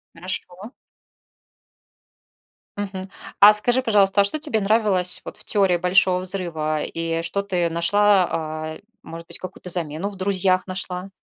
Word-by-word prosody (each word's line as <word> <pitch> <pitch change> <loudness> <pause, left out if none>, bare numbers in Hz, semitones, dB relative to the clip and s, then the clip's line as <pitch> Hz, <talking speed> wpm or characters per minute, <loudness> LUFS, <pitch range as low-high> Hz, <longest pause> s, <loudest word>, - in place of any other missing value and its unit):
Хорошо. 185 +4 -7 2.1
Мгм. 195 -2 -5 0.3
А 205 +1 +9
скажи, 245 +4 +1
пожалуйста, 205 -4 +3
а - - +4
что 200 +10 0
тебе 285 -7 -1
нравилось 195 -3 +3
вот - - -9
в - - -8
"Теории 195 -4 +2
Большого 180 +1 +3
взрыва" 170 -5 -2
и 165 0 -3
что 200 +4 -2
ты 180 -4 -1
нашла? 195 +3 +3
А, 155 0 -4 0.2
может 165 0 -10
быть, - - -4
какую-то 185 0 -9
замену 170 +2 -3
в 205 - -11
"Друзьях" 185 -1 0
нашла? 185 0 -5
185 Hz, 140 wpm, -22 LUFS, 170-200 Hz, 2.1 s, А